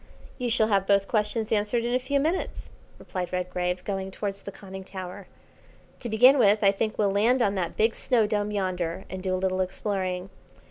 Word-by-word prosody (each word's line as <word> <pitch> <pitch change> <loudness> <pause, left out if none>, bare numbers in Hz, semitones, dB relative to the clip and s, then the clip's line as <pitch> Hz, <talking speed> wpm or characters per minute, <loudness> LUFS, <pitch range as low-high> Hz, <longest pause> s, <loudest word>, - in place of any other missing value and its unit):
"You 245 -1 -1
shall 225 -2 +2
have 195 -2 +2
both 200 -1 +3
questions 215 0 -1
answered 220 +2 +1
in 240 - -1
a 255 - +3
few 280 +2 0
minutes," 320 +6 -2 0.3
replied 180 -2 -5
Redgrave, 180 0 -2
going 195 -1 -3
towards 195 0 -4
the 200 - -7
conning 190 -1 -9
tower. 185 0 -8 0.7
"To 240 - -4
begin 250 +6 +6
with, 210 -1 +4
I 195 - +6
think 215 +2 -2
we'll 205 -2 +2
land 225 +6 +3
on 200 - +2
that 180 -4 -3
big 225 +1 +3
snow 240 -4 +2
dome 210 -1 -1
yonder, 185 -3 -2
and 185 0 -5
do 185 0 -1
a - - -1
little 185 0 0
exploring. 185 -1 -2
200 Hz, 195 wpm, -26 LUFS, 185-220 Hz, 0.7 s, begin